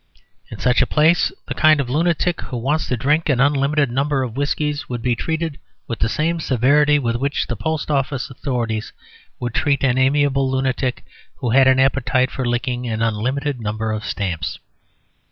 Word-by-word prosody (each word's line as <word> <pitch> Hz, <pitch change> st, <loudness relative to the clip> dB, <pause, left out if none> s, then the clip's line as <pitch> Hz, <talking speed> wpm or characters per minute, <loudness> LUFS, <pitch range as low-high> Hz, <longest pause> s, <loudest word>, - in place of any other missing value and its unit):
In -, -, -8 dB
such 125 Hz, 0 st, +2 dB
a -, -, +2 dB
place 160 Hz, +3 st, +3 dB, 0.2 s
the -, -, -3 dB
kind 155 Hz, -1 st, +4 dB
of 140 Hz, -, -1 dB
lunatic 170 Hz, +5 st, 0 dB
who 125 Hz, -, -6 dB
wants 145 Hz, +7 st, -1 dB
to 125 Hz, -, -1 dB
drink 150 Hz, +7 st, +1 dB
an 130 Hz, -4 st, +2 dB
unlimited 140 Hz, 0 st, +2 dB
number 135 Hz, +1 st, 0 dB
of 120 Hz, -3 st, -5 dB
whiskies 145 Hz, 0 st, -2 dB
would 120 Hz, -2 st, -4 dB
be 125 Hz, -1 st, +1 dB
treated 160 Hz, +3 st, -3 dB, 0.3 s
with 115 Hz, -, -4 dB
the 115 Hz, -, +1 dB
same 165 Hz, +7 st, 0 dB
severity 145 Hz, +2 st, +3 dB
with 120 Hz, -4 st, -1 dB
which 140 Hz, +3 st, -1 dB
the 120 Hz, -, -4 dB
post 155 Hz, +8 st, -2 dB
office 135 Hz, -1 st, -1 dB
authorities 120 Hz, -5 st, -3 dB, 0.5 s
would 120 Hz, -1 st, -4 dB
treat 140 Hz, -3 st, +1 dB
an 130 Hz, -1 st, +2 dB
amiable 135 Hz, 0 st, +2 dB
lunatic 130 Hz, -1 st, -1 dB, 0.3 s
who 125 Hz, -4 st, -3 dB
had 135 Hz, +2 st, +5 dB
an 130 Hz, 0 st, +4 dB
appetite 130 Hz, -1 st, +2 dB
for 130 Hz, -2 st, -3 dB
licking 125 Hz, 0 st, -2 dB
an 110 Hz, -1 st, -2 dB
unlimited 125 Hz, +5 st, -1 dB
number 110 Hz, +1 st, -2 dB
of 110 Hz, 0 st, -3 dB
stamps. 90 Hz, -9 st, -3 dB
130 Hz, 180 wpm, -20 LUFS, 120-145 Hz, 0.5 s, had